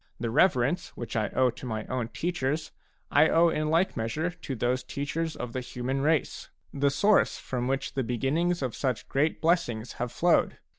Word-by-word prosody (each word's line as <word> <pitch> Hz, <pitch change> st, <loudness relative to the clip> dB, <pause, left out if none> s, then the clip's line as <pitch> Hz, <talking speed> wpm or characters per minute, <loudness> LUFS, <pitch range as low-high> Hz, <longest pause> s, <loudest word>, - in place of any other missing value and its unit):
The 115 Hz, -1 st, -2 dB
reverence 145 Hz, +1 st, +3 dB
which 120 Hz, -1 st, -6 dB
I 110 Hz, -2 st, +1 dB
owe 130 Hz, -1 st, +2 dB
to -, -, -10 dB
my 110 Hz, -2 st, -3 dB
own 125 Hz, -3 st, -2 dB
teachers 155 Hz, 0 st, -2 dB, 0.4 s
I 155 Hz, -, +5 dB
owe 170 Hz, +1 st, +5 dB
in 155 Hz, -1 st, -1 dB
like 165 Hz, +4 st, +2 dB
measure 150 Hz, +10 st, -2 dB
to 165 Hz, -6 st, -6 dB
those 125 Hz, +2 st, 0 dB
teachers 155 Hz, +3 st, -3 dB
of 120 Hz, -1 st, -6 dB
the 130 Hz, -, -2 dB
human 125 Hz, +2 st, -3 dB
race, 155 Hz, 0 st, 0 dB, 0.2 s
the 140 Hz, 0 st, +2 dB
source 200 Hz, +9 st, +3 dB
from 125 Hz, -1 st, -3 dB
which 135 Hz, +1 st, -1 dB
the 135 Hz, -, 0 dB
beginnings 140 Hz, +8 st, 0 dB
of 125 Hz, -4 st, -2 dB
such 130 Hz, -5 st, -2 dB
great 150 Hz, +4 st, +1 dB
blessings 125 Hz, -10 st, +1 dB
have 120 Hz, -1 st, -2 dB
flowed. 175 Hz, 0 st, +2 dB
135 Hz, 185 wpm, -28 LUFS, 125-160 Hz, 0.4 s, I